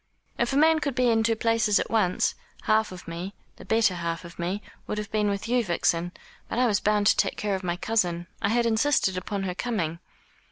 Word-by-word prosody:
"If 235 - +1
a 270 - +1
man 320 +1 +5
could 280 -4 -2
be 250 -2 +3
in 225 -1 +3
two 225 0 +2
places 220 -2 +2
at - - -3
once, 200 -5 +2 0.3
half 220 -1 +2
of 180 -1 -10
me, 175 +4 -6 0.2
the - - -12
better 220 -1 +3
half 170 0 -4
of 170 +1 -12
me, 185 +5 -2 0.2
would 210 - -3
have 210 -1 -5
been 210 -1 +1
with 200 +2 -3
you, 245 0 +2
Vixen; 175 -2 0 0.4
but - - -3
I 250 - +4
was 210 -4 +2
bound 210 -1 +1
to - - +5
take - - 0
care 210 -1 -1
of 190 0 -3
my 175 -1 -1
cousin. 175 -5 0 0.2
I 200 - +1
had 235 +2 +2
insisted 225 -3 +2
upon 195 +2 -3
her 185 -2 -2
coming." 180 -7 -2
210 Hz, 230 wpm, -26 LUFS, 180-230 Hz, 0.4 s, man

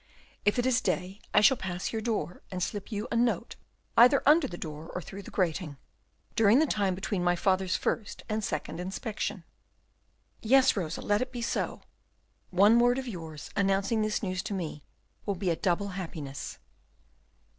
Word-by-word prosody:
If 205 - +3
it 245 - +1
is 255 -1 +3
day, 190 +1 -2
I - - +5
shall 265 +5 +6
pass 185 0 -4
your 220 - -1
door, 210 -7 -2
and 185 -1 -3
slip 205 +3 -4
you 210 0 -3
a - - 0
note 235 0 +1 0.4
either 250 +4 +7
under 300 0 +6
the 175 - -7
door, 155 -1 -7
or - - -1
through 195 +3 -8
the - - -11
grating, 165 -5 -1 0.6
during 225 +1 +5
the 310 - +5
time 200 -9 0
between 190 -1 -2
my 175 0 +3
father's 185 +1 +1
first 215 - -2
and 215 0 -2
second 160 -2 -3
inspection." 190 0 -4 1.0
"Yes, 265 +3 +5
Rosa, 170 -5 -3
let 205 +2 +2
it 255 0 -2
be 240 -2 -4
so. - - -2 0.7
One 205 +6 +5
word 245 +1 +4
of 265 -1 -4
yours, 165 -8 -7
announcing 195 +3 +2
this 215 +1 -1
news 185 -2 -1
to 200 - -4
me, 160 -5 -4 0.5
will 200 - 0
be 180 -1 0
a - - +1
double 195 +3 0
happiness." 160 -7 -6
200 Hz, 175 wpm, -29 LUFS, 180-230 Hz, 1.0 s, either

